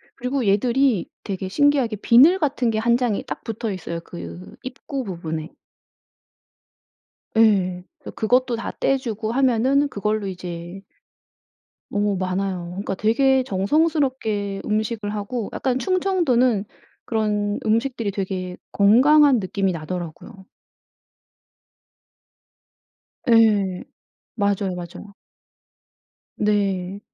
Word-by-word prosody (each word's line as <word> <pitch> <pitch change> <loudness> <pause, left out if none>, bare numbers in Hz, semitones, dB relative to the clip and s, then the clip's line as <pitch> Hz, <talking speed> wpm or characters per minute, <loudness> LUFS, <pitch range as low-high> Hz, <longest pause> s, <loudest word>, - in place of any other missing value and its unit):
그리고 250 0 -2
얘들이 235 +2 +2
되게 190 -2 -4
신기하게 275 0 +2
비늘 275 - +6
같은 270 -6 0
게 220 - -2
1 235 +1 +3
장이 240 -5 -1
딱 - - -6
붙어있어요 195 -7 -4
그 85 - -10
입구 265 +1 -5
부분에. 165 -5 -5 1.9
예. 190 -5 +3 0.2
그래서 - - -9
그것도 245 +2 +2
다 230 - -5
떼 270 - +2
주고 225 -4 -4
하면은 265 +2 +2
그걸로 210 -2 -2
이제 175 0 -7 1.1
어 205 -1 0
많아요. 185 -1 -2
그러니까 195 +2 -4
되게 260 +6 +2
정성스럽게 225 - 0
음식을 215 0 -1
하고 210 +2 -4
약간 260 -1 -1
충청도는 270 - +1 0.4
그런 210 -2 -1
음식들이 230 -1 0
되게 185 -2 -4
건강한 265 +6 +5
느낌이 195 0 -1
나더라고요. 175 +4 -7 2.8
예. 210 -5 +4 0.5
맞아요, 200 -3 0
맞아요. 180 +4 -9 1.2
네. 200 -2 0
210 Hz, 230 characters per minute, -22 LUFS, 190-250 Hz, 2.8 s, 비늘